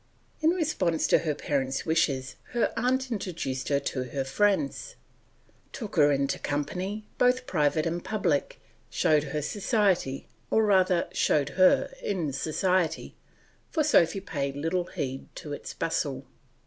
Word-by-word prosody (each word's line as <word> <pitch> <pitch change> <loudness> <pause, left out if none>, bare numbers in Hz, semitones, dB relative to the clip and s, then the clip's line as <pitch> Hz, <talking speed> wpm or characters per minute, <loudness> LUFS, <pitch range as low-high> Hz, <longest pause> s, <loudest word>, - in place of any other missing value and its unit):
In 315 - +3
response 300 - +1
to - - +4
her 155 -3 -1
parents' 135 -2 -1
wishes 140 -5 0 0.2
her 240 - +1
aunt 255 +2 0
introduced 160 - -3
her 140 -1 +3
to 130 -2 -3
her 135 +1 -3
friends, 205 - 0 0.8
took 220 -6 -6
her 145 -3 +5
into 140 0 0
company, 180 +9 -3
both 250 +1 +3
private 155 -4 +1
and 170 +1 -2
public, 175 -9 -1 0.3
showed 150 -1 +2
her 150 +1 -3
society, 195 - 0 0.2
or 220 0 +3
rather 185 -3 +3
showed 145 -2 +2
her 185 - +4
in 170 -8 -2
society, 175 +5 0 0.5
for 315 - +1
Sophy 195 - +3
paid 140 -6 -3
little 165 +5 -1
heed 135 -5 -5
to 150 - -7
its - - -6
bustle. 140 -5 -2
165 Hz, 135 wpm, -27 LUFS, 145-205 Hz, 0.8 s, her